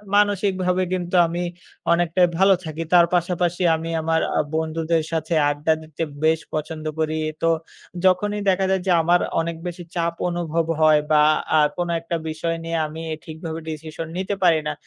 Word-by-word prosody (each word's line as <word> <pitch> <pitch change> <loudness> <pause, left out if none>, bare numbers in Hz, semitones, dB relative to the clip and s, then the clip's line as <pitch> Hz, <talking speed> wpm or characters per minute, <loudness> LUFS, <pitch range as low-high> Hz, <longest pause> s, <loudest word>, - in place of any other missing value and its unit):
মানসিকভাবে 190 -3 +2
কিন্তু 180 0 -2
আমি 170 +2 -3 0.5
অনেকটাই 175 +1 +3
ভালো 195 +2 +6
থাকি। 160 +1 -4
তার 175 -1 +7
পাশাপাশি 175 0 0
আমি 160 +1 -5
আমার 160 0 +1 0.2
আ - - +3 0.2
বন্ধুদের 160 0 0
সাথে 160 0 -2 0.2
আড্ডা 145 +2 +1
দিতে 155 0 -5 0.2
বেশ 160 0 +3
পছন্দ 155 0 -4
করি। 155 0 0 0.3
তো 165 - +3 0.6
যখনই 205 +3 +2
দেখা 190 0 +2
যায় 190 -1 +1
যে - - +3
আমার 175 +2 +3 0.2
অনেক 165 0 -3
বেশি 175 0 -6
চাপ 170 -1 0 0.2
অনুভব 170 -1 -1 0.2
হয় 155 -1 +6
বা 150 -1 +6 0.3
আ - - +6 0.2
কোন 175 -1 -1
একটা 165 +1 -4
বিষয় 165 +1 -2
নিয়ে 165 0 -2
আমি 160 +2 -8 0.2
ঠিকভাবে 160 0 -6
decision 160 +1 -6
নিতে 190 +2 -2
পারি 165 -3 +5
না, 150 - -1
165 Hz, 165 wpm, -22 LUFS, 160-180 Hz, 0.6 s, তার